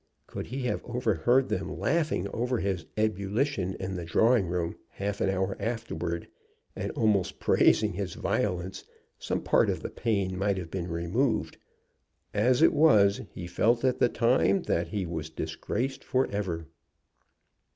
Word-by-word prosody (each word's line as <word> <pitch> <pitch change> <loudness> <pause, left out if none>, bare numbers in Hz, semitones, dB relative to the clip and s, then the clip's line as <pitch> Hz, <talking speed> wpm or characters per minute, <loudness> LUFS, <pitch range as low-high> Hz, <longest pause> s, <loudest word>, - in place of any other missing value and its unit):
Could - - -6
he 130 +1 -4
have 125 - -1
overheard 125 +1 +2
them - - -3
laughing 155 - 0
over 125 +3 -1
his 95 -5 -2
ebullition 105 0 0
in 95 0 -4
the 90 -2 -4
drawing 110 +4 +3
room 85 -1 -2
half 100 0 -4
an - - +2
hour 95 0 0
afterward, 115 -7 -3 0.5
and - - -3
almost 105 -4 +1
praising - - +3
his - - -4
violence, 95 -1 -2 0.4
some - - -2
part - - +3
of - - -2
the - - -4
pain 100 -5 -1
might 100 +1 0
have 85 -3 -6
been 90 -2 -3
removed. 105 +8 0 0.8
As 125 +7 +3
it - - +6
was 105 -11 +5
he 90 - -7
felt 115 +8 +2
at 130 - +1
the 120 - +4
time 130 +12 +2
that 85 0 0
he 95 +2 -2
was 80 -2 -4
disgraced 130 +10 -3
forever. 100 -10 -1
100 Hz, 150 wpm, -28 LUFS, 90-120 Hz, 0.8 s, it